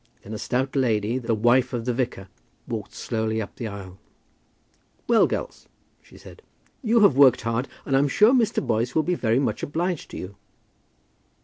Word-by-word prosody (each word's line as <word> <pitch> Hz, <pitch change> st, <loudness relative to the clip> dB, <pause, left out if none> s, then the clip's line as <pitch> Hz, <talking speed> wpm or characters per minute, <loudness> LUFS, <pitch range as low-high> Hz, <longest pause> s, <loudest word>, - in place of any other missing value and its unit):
Then 105 Hz, -, -9 dB
a 105 Hz, -, -5 dB
stout 130 Hz, +2 st, -2 dB
lady, 115 Hz, -2 st, +1 dB
the 115 Hz, -2 st, -1 dB
wife 120 Hz, +4 st, +2 dB
of 120 Hz, -2 st, -3 dB
the 125 Hz, -, 0 dB
vicar, 115 Hz, -6 st, -3 dB, 0.4 s
walked -, -, -6 dB
slowly 110 Hz, 0 st, -2 dB
up 105 Hz, -, -6 dB
the 120 Hz, -4 st, -4 dB
aisle. 95 Hz, -3 st, -9 dB, 1.1 s
"Well, 235 Hz, -2 st, +5 dB
girls," -, -, -5 dB, 0.3 s
she -, -, -18 dB
said, -, -, -14 dB, 0.4 s
"you 230 Hz, -2 st, +3 dB
have 200 Hz, -10 st, +5 dB
worked 130 Hz, -3 st, +6 dB
hard, 115 Hz, +3 st, -2 dB, 0.2 s
and 135 Hz, -, 0 dB
I -, -, +5 dB
am 145 Hz, -, +2 dB
sure 210 Hz, -, +4 dB
Mr. 240 Hz, -5 st, +1 dB
Boyce 115 Hz, +3 st, -1 dB
will 160 Hz, -, +3 dB
be 180 Hz, -, 0 dB
very 115 Hz, -8 st, +1 dB
much 130 Hz, -6 st, -1 dB
obliged 170 Hz, +3 st, -3 dB
to -, -, -8 dB
you." 95 Hz, +2 st, -8 dB
125 Hz, 185 wpm, -24 LUFS, 110-145 Hz, 1.1 s, worked